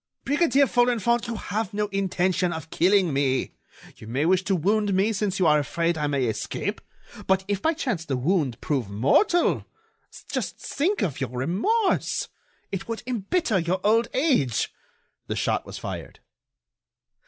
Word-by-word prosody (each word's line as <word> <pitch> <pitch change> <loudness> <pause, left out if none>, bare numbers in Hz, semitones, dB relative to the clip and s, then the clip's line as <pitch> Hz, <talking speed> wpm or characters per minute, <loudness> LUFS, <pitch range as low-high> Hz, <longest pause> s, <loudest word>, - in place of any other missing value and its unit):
"Brigadier 285 -1 +3
Folenfant, 240 -2 +2
you 235 - -3
have 210 -1 -3
no 210 0 +1
intention 185 -2 0
of 160 -1 -6
killing 185 -3 +3
me; 135 -2 0 0.4
you 110 - -12
may 130 +7 0
wish 185 +1 +3
to 195 - +2
wound 200 +3 +1
me 200 +4 +2
since 200 -2 -1
you 185 - +2
are 150 -1 +5
afraid 170 +4 0
I 150 -2 -1
may 140 -3 0
escape. 110 -2 -3 0.5
But 190 0 +2
if 200 -1 -1
by 320 - +2
chance 220 - -2
the 135 -4 -1
wound 140 -3 0
prove 130 -9 -1
mortal? 140 - +2 0.6
Just - - -3
think 365 +9 -1
of 155 -5 -2
your 130 - -1
remorse! 190 - 0 0.4
It 195 -1 -4
would 230 -1 -4
embitter 245 - 0
your 175 +2 0
old 225 +2 +3
age." 255 - +1 0.5
The - - -2
shot - - -1
was - - -7
fired. - - -7
190 Hz, 155 wpm, -25 LUFS, 150-230 Hz, 0.6 s, are